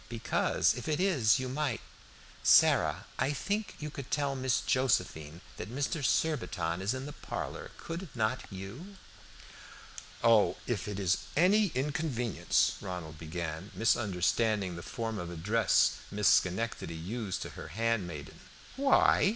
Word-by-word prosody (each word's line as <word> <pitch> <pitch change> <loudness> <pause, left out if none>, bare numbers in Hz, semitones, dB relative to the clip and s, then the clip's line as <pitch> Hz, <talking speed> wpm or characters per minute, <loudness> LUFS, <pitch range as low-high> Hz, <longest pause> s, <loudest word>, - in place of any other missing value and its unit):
"Because 115 -1 +1
if 125 - -7
it 155 0 0
is 145 - +4
you 130 -1 -3
might 135 -2 -1 0.6
Sarah, - - +5
I 135 +3 +1
think 205 +8 -2
you 150 -1 -6
could 140 -3 -8
tell 140 -2 0
Miss 130 -1 +1
Josephine 90 - 0 0.2
that - - -6
Mr. 140 +4 -2
Surbiton 95 - 0
is 100 +7 0
in 130 +1 -5
the 145 - -7
parlor, - - -6
could 170 +1 -6
not 110 -2 0
you?" 110 - -8 1.3
"Oh, 115 -3 +5
if 105 -6 -2
it 100 -1 -4
is 95 -1 +2 0.2
any 200 +5 +5
inconvenience" 135 - 0
Ronald 85 -5 -6
began, 80 +3 -5
misunderstanding 105 -2 +1
the 85 - -7
form 110 +2 -4
of 85 - -5
address 100 +7 +2
Miss 105 -1 +1
Schenectady 95 -2 +1
used 95 +4 -4
to - - -7
her - - -9
handmaiden. 100 -10 -2 0.4
"Why?" 275 -7 +4
115 Hz, 135 wpm, -31 LUFS, 95-140 Hz, 1.3 s, Sarah